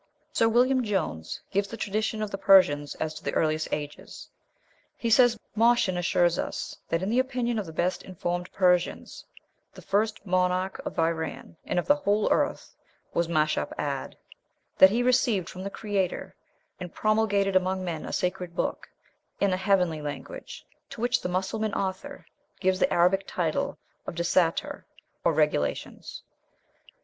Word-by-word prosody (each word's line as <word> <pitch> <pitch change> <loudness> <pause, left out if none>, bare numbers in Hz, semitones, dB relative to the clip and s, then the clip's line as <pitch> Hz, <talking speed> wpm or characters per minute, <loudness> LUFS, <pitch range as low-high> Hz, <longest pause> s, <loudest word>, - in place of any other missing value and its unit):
Sir 225 - +3
William 255 +3 +3
Jones 160 - -2
gives 200 0 +1
the 230 - -8
tradition 215 +1 -1
of 210 - -4
the 195 - -3
Persians 145 -8 +5
as 155 0 -3
to - - -10
the - - -3
earliest 155 0 +1
ages. 145 -1 -6 0.7
He 230 - -2
says: 240 0 +5 0.2
"Moshan 230 -4 +3
assures 175 0 +2
us - - -4
that 165 +2 0
in 190 - -1
the 245 - +3
opinion 245 -3 0
of 200 - -4
the - - -7
best 175 +3 -1
informed 175 -1 -4
Persians 180 -2 +1 0.5
the - - -11
first 215 +1 0
monarch 185 0 0
of - - -7
Iran, 165 0 -2
and - - -2
of 175 - +1
the 290 - +4
whole 210 -7 +1
earth, - - 0 0.4
was 170 - +1
Mashab 155 -2 0
Ad; 140 -2 -3 0.6
that 190 - +10
he 235 +5 +1
received 245 -7 +2
from 185 - -8
the 195 - -4
Creator, 200 -3 -3 0.4
and 180 -2 -6
promulgated 205 -3 +1
among 185 0 +1
men 165 -3 -4
a - - -6
sacred 180 -1 -2
book, - - -2 0.5
in 200 -2 +2
a - - +1
heavenly 180 -5 +1
language, 145 - -7 0.2
to - - -9
which 245 +1 +1
the - - -3
Mussulman 200 +4 -1
author 190 -1 -4 0.3
gives 185 -1 +1
the - - +2
Arabic 185 +3 +3
title 165 -4 -1 0.3
of - - -5
'Desatir,' 170 0 0 0.4
or - - +4
'Regulations.' - - -1
190 Hz, 160 wpm, -27 LUFS, 170-215 Hz, 0.7 s, that